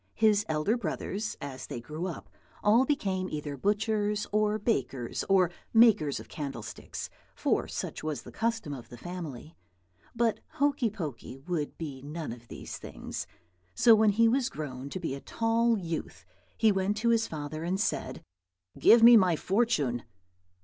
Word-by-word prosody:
His 215 -2 +3
elder 155 +9 +1
brothers, 210 -3 -3
as 135 -3 -7
they - - -5
grew 155 +9 -5
up, 170 - -7 0.4
all 225 +5 +5
became 190 -10 -1
either 150 -1 -4
butchers 210 - 0
or 210 0 +2
bakers 135 - -1
or 185 -3 +4 0.2
makers 215 - +5
of - - -10
candle 135 -7 -5
sticks, - - -7 0.2
for - - 0
such - - -5
was 150 -6 -3
the - - -11
custom 225 -9 -1
of 125 -4 -9
the 120 - -10
family. 165 -2 -7 0.6
But 230 -1 +1
Hokey 280 -4 +1
Pokey 150 - -6
would 150 +1 -3
be 145 -5 -6
none 150 0 -5
of 120 0 -10
these - - -8
things; - - -6 0.5
so 230 - +7
when 220 0 +5
he 230 +3 +4
was 255 +2 +2
grown 140 - -6
to 185 - -5
be 165 -6 -3
a 140 - -6
tall 230 0 +1
youth 170 -4 -5 0.3
he 220 -1 +5
went 195 +1 0
to 235 +2 +1
his 230 -1 +3
father 155 0 -5
and 185 +3 -1
said, 220 - -2 0.6
"Give 230 0 +7
me 235 +1 +10
my 185 -6 +5
fortune." 155 - +1
185 Hz, 165 wpm, -29 LUFS, 150-220 Hz, 0.6 s, me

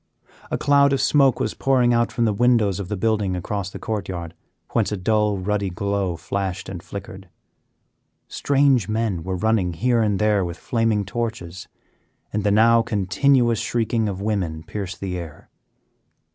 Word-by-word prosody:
A - - -1
cloud 140 -1 +4
of 135 - +1
smoke 135 -1 +3
was 110 - -1
pouring 125 -3 +2
out 120 0 +1
from 120 - 0
the 110 - +1
windows 110 -4 +2
of 100 - -4
the 105 +1 -3
building 105 -3 0
across 95 +1 -3
the - - -8
court 105 -3 -4
yard, 85 -3 -5 0.4
whence - - +1
a 105 - -2
dull 105 +1 +1
ruddy 100 +1 -1
glow 100 0 -2
flashed 95 +2 -4
and 90 -3 -6
flickered. 95 -1 -9 1.0
Strange 135 -7 +2
men 110 -5 -1
were 95 +1 -3
running 95 -2 +1
here 120 +7 +1
and 105 -3 +1
there 105 -2 +2
with 85 -1 -5
flaming 115 -3 0
torches, 100 -5 -5 0.7
and 105 - -1
the 105 - +2
now 115 +3 +5
continuous 115 +3 +2
shrieking 115 -2 0
of 95 -1 -5
women 90 -7 -2
pierced 95 -1 -6
the 90 -2 -3
air. 80 -4 -10
105 Hz, 165 wpm, -22 LUFS, 95-115 Hz, 1.0 s, now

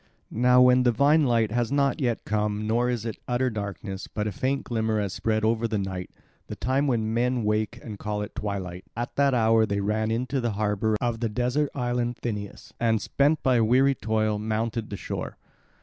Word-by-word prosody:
Now 125 +2 +5
when 125 0 +5
divine 140 +6 +4
light 115 -3 +2
has 120 +1 0
not 140 +1 +1
yet 120 -3 -1
come 105 0 -1
nor 120 +3 +1
is 120 -3 -2
it 115 -3 -4
utter 125 +1 +1
darkness, 100 -2 -5
but 105 - -3
a 105 - -1
faint 130 +7 -1
glimmer 110 -2 -1
has 100 -3 -2
spread 110 -1 0
over 115 +1 +1
the 110 -1 -1
night, 95 -2 -4 0.4
the - - -6
time 135 +4 0
when 110 -4 0
men 125 +1 +1
wake 105 +2 -1
and 105 -4 -8
call 105 0 -3
it 105 - -8
twilight, 95 -3 -4
at 120 +1 -4
that 140 -2 +3
hour 110 -1 +4
they 100 0 -1
ran 110 +2 0
into 125 +4 -1
the 120 -2 -1
harbour 105 +1 0
of 120 -2 -1
the 115 -1 -1
desert 125 +6 0
island 120 -2 -1
Thynias 110 +2 -5
and, 115 -2 +2
spent 145 +7 +1
by 125 -3 +3
weary 130 +5 +4
toil, 110 -3 0
mounted 110 +1 -2
the 100 - -5
shore. - - -5
115 Hz, 195 wpm, -26 LUFS, 105-125 Hz, 0.4 s, Now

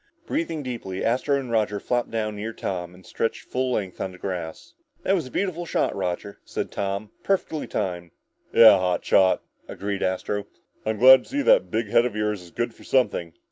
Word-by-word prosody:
Breathing 165 -2 -2
deeply, 115 -7 -4
Astro 135 +4 +1
and 130 -3 -6
Roger 105 -2 +1
flopped 120 +2 -1
down 110 -2 -2
near 110 +2 -5
Tom 90 -3 -4
and 95 - -17
stretched 115 - -2
full 130 0 -2
length 95 -5 -3
on 95 - -2
the - - -12
grass. 90 - -6 0.3
"That 195 - +2
was 170 -9 0
a - - -10
beautiful 175 +2 -2
shot, - - 0
Roger," 95 +1 -4
said - - -4
Tom. 100 +2 -3
"Perfectly 180 -5 -1
timed!" 90 -2 -3 0.4
"Yeah, 110 -4 +8
hot 90 -1 0
shot," 95 -1 +4 0.2
agreed 100 0 -4
Astro, 95 +2 -1 0.4
"I'm 110 -1 0
glad 130 +3 +8
to - - -17
see 285 +1 -1
that - - +4
big 110 -2 -1
head 120 +3 +4
of 110 - -8
yours 105 -2 -1
is 90 - -13
good 120 +5 -3
for - - -17
something!" 90 -10 +1
105 Hz, 195 wpm, -24 LUFS, 95-130 Hz, 0.4 s, Yeah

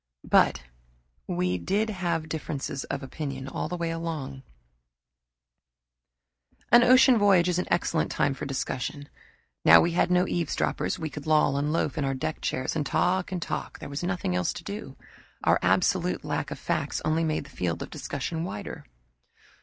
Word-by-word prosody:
But - - +4 0.6
we 90 +1 0
did 210 - 0
have 170 -5 -2
differences 145 -3 -4
of 140 - -4
opinion, 135 -1 -5
all 135 - -3
the 180 - -3
long 165 -4 -3
way. 135 - -14 2.3
An 240 - +8
ocean 255 -1 +6
voyage 195 -4 +5
is 180 -1 +1
an - - -2
excellent 170 -1 +1
time 140 - +1
for 135 - -6
discussion. 140 +1 -4 0.5
Now 85 - +9
we 170 - +2
had 175 +1 +2
no 180 0 +3
eavesdroppers, 175 +2 -1
we 160 -3 -4
could 145 +2 -8
loll 150 -2 +4
and 145 +2 0
loaf 155 -3 0
in - - 0
our 135 0 0
deck 155 +4 -3
chairs 130 - -2
and 155 - 0
talk 180 +6 +1
and 185 - -2
talk - - -4
there - - -8
was 140 +1 -4
nothing 175 - -1
else 90 -1 0
to - - -8
do. - - -7 0.5
Our - - +4
absolute - - +1
lack - - -2
of - - -5
facts - - -2
only 160 +1 +1
made 155 -2 0
the 140 - -15
field 85 -8 -2
of - - -10
discussion 165 -1 -4
wider. 105 - -6
155 Hz, 170 wpm, -27 LUFS, 135-175 Hz, 2.3 s, Now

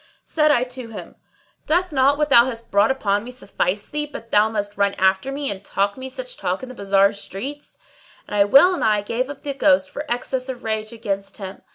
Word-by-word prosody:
Said 305 -1 +2
I 250 -5 +4
to 250 -1 -7
him, 225 - -9 0.5
"Doth 355 +3 +2
not 280 0 +3
what 300 0 0
thou 235 -3 +7
hast 230 -3 -7
brought 200 +2 +4
upon 205 -6 0
me 240 - -9
suffice 205 -5 -2
thee, 295 0 -3
but 230 -4 -9
thou 210 +1 +4
must 205 -2 -3
run 200 0 +1
after 190 +7 +1
me 280 -2 -1
and 195 0 -6
talk 200 0 -1
me 260 0 -7
such - - -7
talk - - -2
in 260 - -7
the - - -8
bazar 200 -2 +2
streets?" 255 +9 -8 0.5
And - - -9
I 200 -1 +5
well 280 - +6
nigh 210 -6 +2
gave 235 +6 -2
up 285 - -9
the 285 - -3
ghost 185 -8 +2
for - - -5
excess 255 +2 -2
of 250 -1 -6
rage 220 -1 -2
against 200 -4 -4
him. 195 -1 -8
230 Hz, 220 wpm, -21 LUFS, 200-270 Hz, 0.5 s, thou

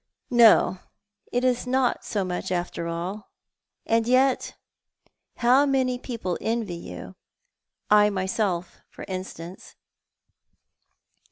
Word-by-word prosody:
No, 230 -5 +6 0.5
it 245 +1 0
is 250 -1 +1
not 260 -1 +1
much 185 -2 -2
after 175 -1 -2
all. 175 +5 -5 0.6
And 230 0 +1
yet 260 +1 +2 0.8
how 255 +4 +4
many 260 -2 +1
people 230 -9 -4
envy 225 -4 -2
you 170 - -8 0.4
— - - -33
L 210 0 +6
myself, 190 -2 -2
f - - -28
tr - - -8
instance 185 -2 -8
215 Hz, 105 wpm, -25 LUFS, 185-245 Hz, 0.8 s, No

